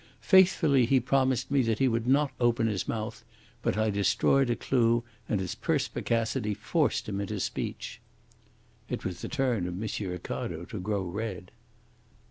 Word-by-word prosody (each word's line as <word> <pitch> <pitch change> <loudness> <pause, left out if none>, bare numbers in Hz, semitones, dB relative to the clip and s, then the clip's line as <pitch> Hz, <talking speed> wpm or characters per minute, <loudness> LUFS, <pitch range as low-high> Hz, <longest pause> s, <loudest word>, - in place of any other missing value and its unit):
Faithfully 165 - +5
he 135 +1 +4
promised 130 0 +1
me 140 -1 +4
that 115 -3 0
he 135 - +3
would 115 -1 0
not 140 +1 +3
open 120 -1 +2
his 105 -4 -1
mouth, 110 0 -4 0.4
but - - 0
I 110 0 +2
destroyed 120 +6 +2
a 120 - +2
clue, 120 -2 +2 0.3
and 105 - +1
his 95 -2 -3
perspicacity 115 -7 -1
forced - - 0
him 100 -1 -2
into 100 +1 -3
speech.'" - - -4 0.9
It - - -4
was 90 -1 -4
the - - -5
turn 125 - 0
of 90 - -4
M. 105 -2 -3
Ricardo 85 -1 -5
to 105 +2 -6
grow 100 +1 -1
red. 95 0 -5
115 Hz, 160 wpm, -28 LUFS, 100-130 Hz, 0.9 s, Faithfully